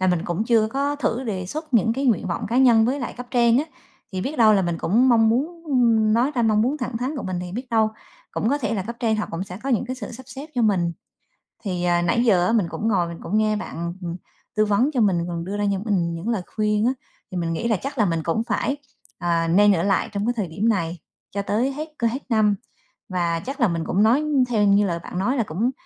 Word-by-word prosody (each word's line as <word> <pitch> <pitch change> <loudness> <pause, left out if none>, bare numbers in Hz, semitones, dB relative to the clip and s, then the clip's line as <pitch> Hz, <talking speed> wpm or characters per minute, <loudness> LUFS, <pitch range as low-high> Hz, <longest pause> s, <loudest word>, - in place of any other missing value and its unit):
là 185 - +2
mình 180 -3 +1
cũng 175 +5 -1
chưa 225 -2 +3
có 280 +5 -1
thử 255 -3 -1
đề 190 -6 -3
xuất 305 - -6
những 225 0 +4
cái 270 +4 -2
nguyện 225 -5 +2
vọng 175 - -3
cá 235 - -1
nhân 235 -4 +6
với 265 +5 0
lại 245 - -4
cấp 250 0 -7
trên 235 -1 +4
á, 290 - +1 0.5
thì 185 - -2
biết 275 +10 -3
đâu 220 -2 +7
là 195 -2 +3
mình 170 -1 -2
cũng 235 +11 +3
mong 225 -2 +5
muốn 310 +9 -1
ưm, 230 -7 +3
nói 245 +5 +2
ra 240 - +1
mong 215 -1 +3
muốn 265 +5 0
thẳng 250 -3 -3
thắn 255 +6 -3
của 265 - -4
mình, 185 -1 -3
thì 180 0 -6
biết 245 +6 -5
đâu 220 -1 +3 0.4
cũng 220 - -1
có 285 +3 +1
thể 230 -4 -1
là 195 - -1
cấp 235 +5 -7
trên 225 -3 +1
họ 215 - -2
cũng 165 +3 -3
sẽ 180 -1 -9
có 275 - -4
những 245 -2 +1
cái 255 - -3
sự 240 -1 -7
sắp 255 - -9
xếp 270 +3 -8
cho 245 - +1
mình. 180 -6 +2 0.7
Thì, 180 -4 -2
à, 175 -1 +2
nãy 175 +8 +2
giờ 190 -7 +4
á, - - +2
mình 210 -7 +2
cũng 220 - -3
ngồi 185 -6 +2
mình 170 0 -7
cũng 210 +5 -1
nghe 215 0 +2
bạn, 170 -5 -5
ừm, 170 -1 -4 0.4
tư 215 0 +3
vấn 210 +7 +2
cho 250 - +2
mình 180 -5 +2
còn 170 -1 -4
đưa 200 +3 -4
ra 205 - -1
cho 195 - -2
mình 180 -6 0
những 170 +7 -4
lời 225 -5 0
khuyên 210 0 +1
á, 250 - +3 0.4
thì 185 - -4
mình 165 -1 -1
nghĩ 230 +8 -2
là 220 -3 +2
chắc 275 +1 -5
là 215 - +3
mình 165 -3 -1
cũng 170 +8 0
phải, 275 +3 -1 0.4
à, 170 -1 0
nên 205 +5 +5
ở 170 -2 0
lại 195 +3 +1
trong 205 0 -2
cái 240 - +1
thời 210 -5 -2
điểm 195 +8 0
này 170 -5 -1 0.3
cho 200 - -2
tới 225 +7 0
hết 305 +3 -5
cơ 235 - +1
hết 240 +4 -2
năm. 215 -3 +3 0.5
Và 170 -3 0
chắc 270 - -6
là 235 - +5
mình 165 -3 -2
cũng 200 +3 +2
nói 245 +7 +4 0.3
theo 220 -4 +2
như 205 0 +4
lời 170 -1 -2
bạn 180 - -5
nói 250 +8 0
là 235 - +2
cũng 210 +8 -1
215 Hz, 275 wpm, -23 LUFS, 185-240 Hz, 0.7 s, đâu